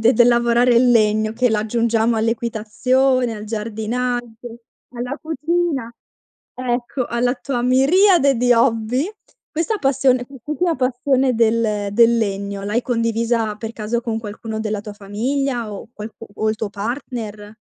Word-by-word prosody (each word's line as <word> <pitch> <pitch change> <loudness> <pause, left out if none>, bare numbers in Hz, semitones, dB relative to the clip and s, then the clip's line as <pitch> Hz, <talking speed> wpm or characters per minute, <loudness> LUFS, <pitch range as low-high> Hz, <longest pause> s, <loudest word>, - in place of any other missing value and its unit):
de 230 +3 +5
del 240 +1 +5
lavorare 240 +1 +3
il 245 +1 +5
legno 215 -1 +3
che 250 +2 +2
l'aggiungiamo 225 +1 +1
all'equitazione, 235 +3 +1
al 210 -1 -7
giardinaggio, 230 +2 -4 0.3
alla 250 +3 -5
cucina 315 -5 -1 0.6
ecco, 250 +1 -2
alla 245 +1 0
tua 250 -2 -3
miriade 280 +3 +4
di 245 +1 +3
hobby. 240 - +1 0.4
Questa 340 +8 -1
passione, 265 -2 +2
quest'ultima 295 +6 -2
passione 260 +1 +1
del 220 -2 +1
del 235 +2 +5
legno, 200 -2 -2
l'hai 210 +4 0
condivisa 230 -2 0
per 225 +1 -6
caso 230 +1 -2
con 230 -2 -3
qualcuno 220 +1 -6
della 215 -1 -2
tua 210 0 -8
famiglia 235 +3 -2
o 200 +2 -8
qualcu 215 +2 -9
o 220 - -1
il 215 - +1
tuo 215 -1 -4
partner? 215 -1 -5
235 Hz, 135 wpm, -20 LUFS, 220-255 Hz, 0.6 s, de